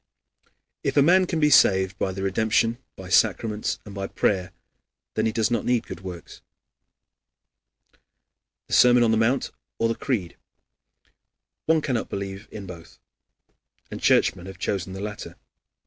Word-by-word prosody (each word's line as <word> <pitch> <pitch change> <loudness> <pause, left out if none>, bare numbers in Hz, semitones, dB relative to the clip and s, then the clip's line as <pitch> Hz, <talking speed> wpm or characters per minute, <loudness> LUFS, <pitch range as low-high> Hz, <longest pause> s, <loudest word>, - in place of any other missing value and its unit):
If - - -1
a 140 - +7
man 185 +4 +4
can 165 - -2
be 150 -1 +3
saved 95 -5 +4
by 95 - -1
the 95 +1 -5
redemption, 110 +4 +1 0.2
by 95 -1 -10
sacraments, 105 +3 +1
and 105 - -10
by 95 -1 -4
prayer, 95 -2 -1 0.6
then 110 +1 0
he - - 0
does 110 0 0
not 115 -3 0
need 125 -2 0
good - - -8
works. 90 -3 -9 2.2
The - - -8
Sermon 125 -1 +6
on 115 - +3
the 110 - +2
Mount, 120 +4 +1 0.3
or 115 - +1
the 115 - 0
Creed. 110 -9 -3 1.3
One 160 0 +3
cannot 125 -5 -2
believe 100 +1 -6
in 100 -2 -8
both. 85 -3 -12 0.9
And - - -7
Churchmen 90 +1 +2
have 95 -1 -9
chosen 95 -1 -3
the 95 - -7
latter. 105 0 -7
105 Hz, 150 wpm, -24 LUFS, 95-120 Hz, 2.2 s, a